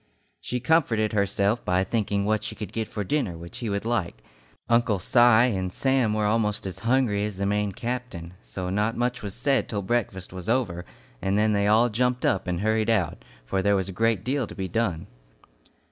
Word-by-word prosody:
She 125 Hz, -, -3 dB
comforted 120 Hz, -7 st, +2 dB
herself 100 Hz, +2 st, +1 dB
by 90 Hz, +1 st, +1 dB
thinking 100 Hz, -1 st, -1 dB
what 110 Hz, 0 st, +1 dB
she -, -, -5 dB
could 105 Hz, -, -7 dB
get 110 Hz, -1 st, -2 dB
for 105 Hz, -, -4 dB
dinner 100 Hz, -, -1 dB
which 85 Hz, +7 st, -8 dB
he 120 Hz, -4 st, -3 dB
would 100 Hz, +1 st, -2 dB
like. 90 Hz, -, -2 dB, 0.4 s
Uncle 115 Hz, -3 st, +3 dB
Si 95 Hz, +6 st, +1 dB
and 115 Hz, -6 st, +4 dB
Sam 130 Hz, -2 st, +1 dB
were 105 Hz, -1 st, +1 dB
almost 105 Hz, -1 st, 0 dB
as 95 Hz, -3 st, -5 dB
hungry 115 Hz, -4 st, +1 dB
as 105 Hz, -2 st, -4 dB
the 100 Hz, -, -1 dB
Maine 105 Hz, 0 st, 0 dB
captain, 115 Hz, -6 st, -5 dB
so 90 Hz, +10 st, -5 dB
not 105 Hz, +3 st, 0 dB
much 125 Hz, +1 st, -1 dB
was 100 Hz, -2 st, -6 dB
said 135 Hz, +3 st, +1 dB
till 100 Hz, -2 st, -2 dB
breakfast 95 Hz, -4 st, -2 dB
was 90 Hz, +2 st, -6 dB
over, 105 Hz, -9 st, 0 dB, 0.4 s
and 95 Hz, +2 st, 0 dB
then 105 Hz, 0 st, +3 dB
they 100 Hz, 0 st, +2 dB
all 110 Hz, +3 st, +4 dB
jumped 125 Hz, +3 st, 0 dB
up 95 Hz, 0 st, +1 dB
and 90 Hz, 0 st, -1 dB
hurried 110 Hz, +1 st, +1 dB
out, 110 Hz, -2 st, 0 dB, 0.2 s
for 95 Hz, +9 st, -1 dB
there 100 Hz, +1 st, +3 dB
was 95 Hz, -1 st, -1 dB
a 115 Hz, +4 st, +2 dB
deal 130 Hz, +3 st, -2 dB
to -, -, -10 dB
be 95 Hz, -2 st, -3 dB
done. 90 Hz, -3 st, -1 dB
105 Hz, 200 wpm, -25 LUFS, 95-120 Hz, 0.4 s, and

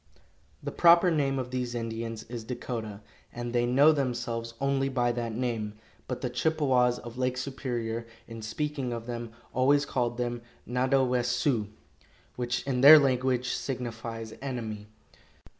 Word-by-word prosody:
The -, -, -3 dB
proper 175 Hz, +1 st, +6 dB
name 140 Hz, -4 st, +1 dB
of 125 Hz, -1 st, -4 dB
these 125 Hz, -1 st, -2 dB
Indians 115 Hz, -1 st, -4 dB
is 120 Hz, 0 st, -7 dB
Dakota, 110 Hz, -3 st, -5 dB, 0.3 s
and 120 Hz, 0 st, -5 dB
they 120 Hz, 0 st, +2 dB
know 140 Hz, +5 st, +6 dB
themselves 120 Hz, -4 st, -2 dB
only 135 Hz, 0 st, +1 dB
by 120 Hz, -2 st, +1 dB
that 120 Hz, -1 st, -3 dB
name, 115 Hz, -4 st, -2 dB, 0.3 s
but 125 Hz, -1 st, -4 dB
the 125 Hz, -, -1 dB
Chippewas 130 Hz, -3 st, +2 dB
of 120 Hz, +1 st, -9 dB
Lake 125 Hz, 0 st, 0 dB
Superior, 120 Hz, -3 st, -3 dB, 0.2 s
in 115 Hz, -1 st, -8 dB
speaking 135 Hz, +2 st, -3 dB
of 115 Hz, -1 st, -5 dB
them, 120 Hz, -1 st, -5 dB, 0.2 s
always 140 Hz, +3 st, +3 dB
called 120 Hz, -3 st, -1 dB
them, 120 Hz, -1 st, -2 dB, 0.3 s
"Nadowessioux," 125 Hz, -2 st, +1 dB, 0.7 s
which 120 Hz, 0 st, -2 dB
in 130 Hz, -2 st, 0 dB
their 150 Hz, +3 st, +11 dB
language 130 Hz, -2 st, +1 dB
signifies 115 Hz, -3 st, -4 dB
"enemy." 110 Hz, -6 st, -5 dB
125 Hz, 140 wpm, -28 LUFS, 115-130 Hz, 0.7 s, their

